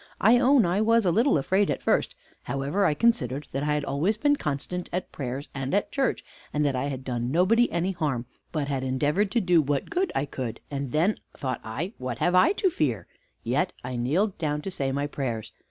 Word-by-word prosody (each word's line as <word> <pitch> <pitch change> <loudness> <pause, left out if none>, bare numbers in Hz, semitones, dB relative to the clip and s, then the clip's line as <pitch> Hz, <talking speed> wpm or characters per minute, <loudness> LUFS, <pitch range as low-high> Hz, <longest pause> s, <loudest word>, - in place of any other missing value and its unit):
I 235 +4 +6
own 260 -3 +5
I 180 +4 +1
was 230 0 +3
a 175 - +4
little 230 - +3
afraid 190 +8 +2
at - - -2
first; - - +1 0.3
however, 145 +9 0
I 150 - +1
considered 145 - +1
that 135 - -2
I 150 +1 +1
had 150 -1 -1
always 170 +12 0
been 290 +5 +3
constant 175 - -4
at 180 +1 -3
prayers, 135 +1 -5
and 135 +5 -2
at 205 - 0
church, 270 -3 0 0.3
and 150 0 +1
that 140 -2 +1
I 130 +2 -1
had 135 -2 -4
done 120 -2 -2
nobody 210 - +3
any 170 +3 0
harm, 145 -9 -2 0.3
but 150 -3 -2
had 135 -2 -2
endeavored 145 +10 +1
to 235 - +1
do 175 -3 +4
what 145 -1 -2
good 370 +2 0
I 135 - +1
could; 130 -5 -5
and 140 -2 -3
then 175 - +2 0.2
thought 130 -3 -3
I, 140 - -4
what 125 -2 -4
have 175 - +1
I 185 - +5
to 385 -2 +1
fear? 120 - -1 0.4
Yet - - 0
I 125 0 -4
kneeled 165 - 0
down 150 -2 -1
to 195 - -4
say 135 -6 -2
my 140 +1 -1
prayers. 115 -7 -4
150 Hz, 220 wpm, -26 LUFS, 135-195 Hz, 0.4 s, I